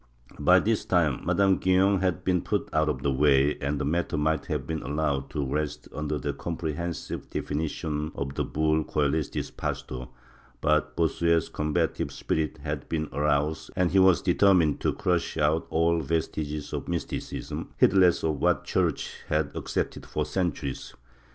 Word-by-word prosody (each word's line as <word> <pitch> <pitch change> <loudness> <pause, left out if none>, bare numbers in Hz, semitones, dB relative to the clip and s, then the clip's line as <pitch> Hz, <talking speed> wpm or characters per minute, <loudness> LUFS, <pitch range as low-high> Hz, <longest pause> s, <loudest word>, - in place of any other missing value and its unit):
By 90 +6 +6
this 110 +2 0
time 80 -8 +1
Madame 95 -1 +3
Guyon 95 +1 +3
had 90 -1 0
been 90 -2 +2
put - - -2
out 80 0 +2
of 70 -2 -3
the 70 - +2
way, 70 +1 +4
and 70 +1 -1
the - - -1
matter 80 +1 0
might 80 0 0
have - - -2
been 80 -1 -3
allowed 70 -2 -1
to 75 -1 -2
rest 75 +2 -3
under 75 +1 -2
the 65 - -3
comprehensive 85 0 -4
definitions 75 0 -3
of 70 -1 -3
the - - -1
bull 80 +1 +1
Ccelestis 75 0 -1
pastor, 65 -1 -4 0.5
but 75 0 +1
Bossuet' 85 0 +2
s 80 - -2
combative 75 -1 -1
spirit 80 -2 -2
had - - -4
been 80 -1 -2
aroused 75 +2 0
and 90 -3 +2
he 95 - +4
was 95 -4 +5
determined 90 -7 +4
to - - +1
crush 90 -3 -1
out 75 +1 +1
all 85 +1 +2
vestiges 75 -2 -2
of - - -4
Mysticism, - - -4
heedless 95 -3 +4
of 80 -2 0
what - - +2
the - - -23
Church - - -1
had 75 -2 0
accepted - - -3
for - - -2
centuries. 85 -7 -3
80 Hz, 165 wpm, -27 LUFS, 75-85 Hz, 0.5 s, By